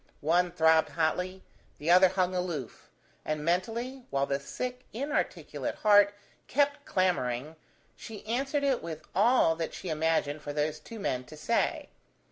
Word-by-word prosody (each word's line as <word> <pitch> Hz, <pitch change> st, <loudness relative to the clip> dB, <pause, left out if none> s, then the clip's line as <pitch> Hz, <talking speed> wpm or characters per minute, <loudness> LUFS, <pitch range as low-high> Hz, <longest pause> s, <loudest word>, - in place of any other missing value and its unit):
One 175 Hz, +4 st, +2 dB
throbbed 160 Hz, -2 st, +4 dB
hotly, 180 Hz, +3 st, -1 dB, 0.3 s
the 155 Hz, +3 st, 0 dB
other 185 Hz, +1 st, +8 dB
hung 185 Hz, 0 st, 0 dB
aloof, 175 Hz, -8 st, -4 dB, 0.3 s
and 155 Hz, -1 st, -3 dB
mentally, 230 Hz, +9 st, -1 dB
while 140 Hz, 0 st, +1 dB
the 140 Hz, 0 st, -1 dB
sick 250 Hz, -, -5 dB
inarticulate 285 Hz, +7 st, -2 dB
heart 205 Hz, -1 st, +5 dB, 0.3 s
kept 285 Hz, +1 st, +1 dB
clamouring, 155 Hz, -6 st, 0 dB, 0.4 s
she 220 Hz, -2 st, -10 dB
answered 270 Hz, +6 st, -1 dB
it 270 Hz, -3 st, +1 dB
with 160 Hz, -2 st, -6 dB
all 205 Hz, -4 st, +4 dB
that 165 Hz, -1 st, -4 dB
she 185 Hz, -, -6 dB
imagined 155 Hz, -2 st, 0 dB
for 145 Hz, -, -5 dB
those 150 Hz, +1 st, -1 dB
two 225 Hz, +9 st, -10 dB
men 130 Hz, -10 st, -1 dB
to 155 Hz, -, -12 dB
say. 230 Hz, +10 st, 0 dB
180 Hz, 145 wpm, -29 LUFS, 155-225 Hz, 0.4 s, other